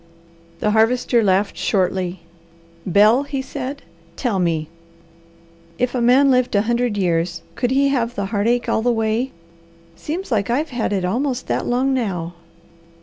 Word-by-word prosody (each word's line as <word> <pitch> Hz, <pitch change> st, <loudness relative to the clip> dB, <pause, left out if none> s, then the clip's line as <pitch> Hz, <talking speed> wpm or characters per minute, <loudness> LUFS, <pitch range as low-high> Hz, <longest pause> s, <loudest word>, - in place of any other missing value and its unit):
The 210 Hz, -, +2 dB
Harvester 230 Hz, +2 st, +2 dB
laughed 195 Hz, +1 st, +1 dB
shortly. 185 Hz, -2 st, -1 dB, 0.7 s
"Bel," 210 Hz, +7 st, +5 dB
he 280 Hz, -1 st, -4 dB
said, 275 Hz, +1 st, -6 dB, 0.3 s
"tell 220 Hz, -4 st, -1 dB
me! 165 Hz, -3 st, 0 dB, 1.1 s
If 250 Hz, 0 st, 0 dB
a 250 Hz, -, -1 dB
man 260 Hz, +4 st, +5 dB
lived 250 Hz, -3 st, +2 dB
a 200 Hz, -, +3 dB
hundred 235 Hz, -1 st, 0 dB
years, 170 Hz, -2 st, 0 dB
could 245 Hz, -, -1 dB
he 275 Hz, +2 st, +3 dB
have 245 Hz, -3 st, -1 dB
the 200 Hz, -, -2 dB
heartache 230 Hz, +4 st, +1 dB
all -, -, +1 dB
the 245 Hz, +2 st, +2 dB
way? 225 Hz, +3 st, 0 dB, 0.6 s
Seems 335 Hz, -, -5 dB
like 210 Hz, -2 st, 0 dB
I've 285 Hz, +7 st, 0 dB
had 240 Hz, -4 st, -2 dB
it 190 Hz, -3 st, 0 dB
almost 250 Hz, +6 st, -1 dB
that -, -, -2 dB
long 255 Hz, +2 st, +1 dB
now. 180 Hz, -9 st, -2 dB
235 Hz, 150 wpm, -20 LUFS, 200-255 Hz, 1.1 s, Bel